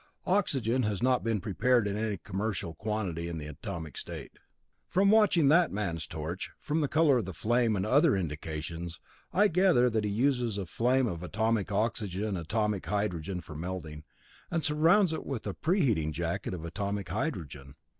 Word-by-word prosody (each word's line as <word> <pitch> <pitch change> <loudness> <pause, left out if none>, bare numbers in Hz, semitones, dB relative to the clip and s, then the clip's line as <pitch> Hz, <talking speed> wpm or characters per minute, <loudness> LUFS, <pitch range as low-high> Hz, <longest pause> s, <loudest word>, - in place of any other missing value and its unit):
Oxygen 130 - +1
has 105 -2 -1
not 130 -1 +3
been 115 -2 0
prepared 110 +3 +2
in 100 - -2
any 105 -1 -1
commercial 95 -2 -3
quantity 95 -5 -3
in 85 -1 -4
the 75 - -6
atomic 80 +1 -6
state. - - -7 0.6
From 195 +2 +3
watching 205 -8 +5
that 170 +2 +5
man's 90 -6 -3
torch, 80 +2 -5
from 155 +2 -1
the 145 - +1
color 150 -3 +4
of 110 - -3
the 95 -2 -7
flame 115 +3 +2
and 95 0 -1
other 145 +5 +4
indications, 80 0 -5 0.3
I 210 +2 +4
gather 170 -10 +4
that 110 -1 0
he 105 - 0
uses 120 0 +1
a 100 - -3
flame 125 +8 +2
of 85 -7 -3
atomic 110 +2 0
oxygen 105 -1 -1
atomic 105 +3 -1
hydrogen 95 -3 -2
for - - -10
melting, 80 -2 -5 0.5
and 165 -2 -1
surrounds 160 +5 +4
it - - -4
with 130 -5 -5
a 100 - -2
preheating 130 - +1
jacket 85 +3 -2
of 85 -2 -7
atomic 100 +3 -3
hydrogen. 70 -2 -4
105 Hz, 170 wpm, -30 LUFS, 85-130 Hz, 0.6 s, watching